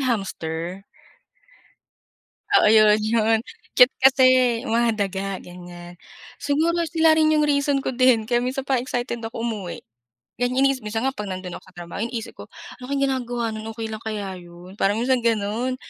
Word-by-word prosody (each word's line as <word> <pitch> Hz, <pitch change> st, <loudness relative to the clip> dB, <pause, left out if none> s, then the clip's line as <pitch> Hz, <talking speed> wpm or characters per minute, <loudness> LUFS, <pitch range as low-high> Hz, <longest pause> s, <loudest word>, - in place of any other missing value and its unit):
yung 255 Hz, -2 st, 0 dB
hamster? 180 Hz, 0 st, -6 dB, 1.7 s
Oo, -, -, +3 dB
yun, 215 Hz, -1 st, +6 dB
yun. 225 Hz, +1 st, +2 dB, 0.3 s
Cute 250 Hz, +2 st, +6 dB
kasi 265 Hz, 0 st, +6 dB, 0.4 s
mga 235 Hz, +1 st, +2 dB
daga, 195 Hz, -1 st, -3 dB
ganiyan. 175 Hz, 0 st, -11 dB, 0.4 s
Siguro 315 Hz, +4 st, 0 dB
sila 320 Hz, 0 st, +3 dB
rin 310 Hz, 0 st, +3 dB
yung 300 Hz, -1 st, +3 dB
reason 280 Hz, -1 st, +1 dB
ko 265 Hz, -, -3 dB
din 245 Hz, -3 st, +3 dB
kaya 240 Hz, 0 st, +1 dB
minsan 265 Hz, +1 st, -3 dB
parang 260 Hz, -2 st, 0 dB
excited 245 Hz, -2 st, -3 dB
ako 225 Hz, 0 st, -6 dB
umuwi. 215 Hz, -7 st, -4 dB, 0.6 s
Ganiyan 250 Hz, +2 st, +1 dB
inii 275 Hz, -1 st, 0 dB
Minsan 225 Hz, +3 st, -3 dB
nga 270 Hz, -, 0 dB
'pag 210 Hz, -4 st, -6 dB
nandun 185 Hz, -1 st, -6 dB
ako -, -, -13 dB
sa 180 Hz, -, -32 dB
trabaho, 175 Hz, +2 st, -7 dB
yung 235 Hz, -, -6 dB
isip 225 Hz, -2 st, -5 dB
ko, -, -, -7 dB, 0.4 s
"Ano 250 Hz, -, -9 dB
kaya 280 Hz, 0 st, -1 dB
ginagawa 245 Hz, -3 st, -2 dB
nun, 215 Hz, 0 st, -7 dB
okey 225 Hz, 0 st, -5 dB
lang 215 Hz, -, -6 dB
kaya 205 Hz, -4 st, -4 dB
yun?" 175 Hz, +2 st, -14 dB
Parang 200 Hz, +2 st, +2 dB
minsan 255 Hz, +1 st, +1 dB
ganun. 230 Hz, +3 st, 0 dB
230 Hz, 175 wpm, -23 LUFS, 195-260 Hz, 1.7 s, yun